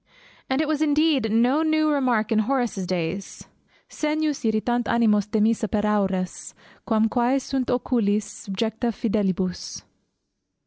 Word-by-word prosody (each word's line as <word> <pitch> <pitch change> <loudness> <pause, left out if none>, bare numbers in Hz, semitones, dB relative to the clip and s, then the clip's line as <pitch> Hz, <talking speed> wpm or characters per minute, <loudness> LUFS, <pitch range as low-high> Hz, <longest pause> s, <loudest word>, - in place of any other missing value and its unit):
And 265 +3 +1
it 310 - -1
was 310 -1 -1
indeed 295 -6 +2
no 245 +7 +3
new 315 -1 +2
remark 245 -7 +1
in 220 - +3
Horace's 230 -5 -1
days, 180 +2 -4 0.4
Segnius 305 -1 -2
irritant 230 +2 0
animos 210 -3 +2
demissa 220 0 +1
per 210 +1 0
aures, 190 -3 -1 0.3
Quam 220 -1 +3
quæ 245 +4 +1
sunt 265 -1 -3
oculis 225 -4 +1 0.2
subjecta 225 +4 -2
fidelibus. 195 -4 -2
225 Hz, 125 wpm, -24 LUFS, 210-265 Hz, 0.4 s, no